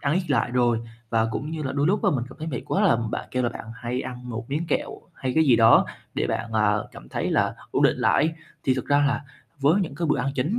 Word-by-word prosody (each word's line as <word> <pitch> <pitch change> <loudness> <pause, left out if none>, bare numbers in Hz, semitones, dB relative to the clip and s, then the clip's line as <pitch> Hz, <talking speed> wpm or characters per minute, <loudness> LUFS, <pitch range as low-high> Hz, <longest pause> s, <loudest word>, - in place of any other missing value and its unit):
ăn 145 +2 +1
ít 180 -3 -1
lại 135 - +2
rồi, 120 -2 +2 0.3
và 115 -1 +2
cũng 145 +7 -4
như 160 -1 -4
là 130 - -2
đôi 140 +1 +1
lúc 205 +5 +1
á 195 - +5
mình 125 -4 0
cảm 135 - -14
thấy 155 - -5
mệt 125 -6 -3
quá - - +1
là, - - +5
ừm, 115 -1 +1
bạn - - -4
kêu 125 0 0
là 120 - +2
bạn 120 - -8
hay 120 +2 -3
ăn 125 -1 -7
1 115 +1 -4
miếng 160 +4 -1
kẹo - - 0 0.2
hay 130 -1 -3
cái 160 - +4
gì 130 -5 +5
đó 115 -1 +6 0.3
để - - 0
bạn, 115 - -3
à, 105 -1 +3 0.2
cảm - - -12
thấy - - -2
là - - +2 0.2
ổn - - +1
định - - +4
lại - - +3
ấy. 160 - +1 0.3
Thì 130 - +3
thực 130 - -4
ra 145 0 +3
là, 140 +1 -1 0.4
với 155 +8 +4
những 160 -7 -3
cái 165 +4 -2
bữa 150 - +2
ăn 135 +2 0
chính 150 - 0
130 Hz, 290 wpm, -25 LUFS, 120-150 Hz, 0.4 s, đó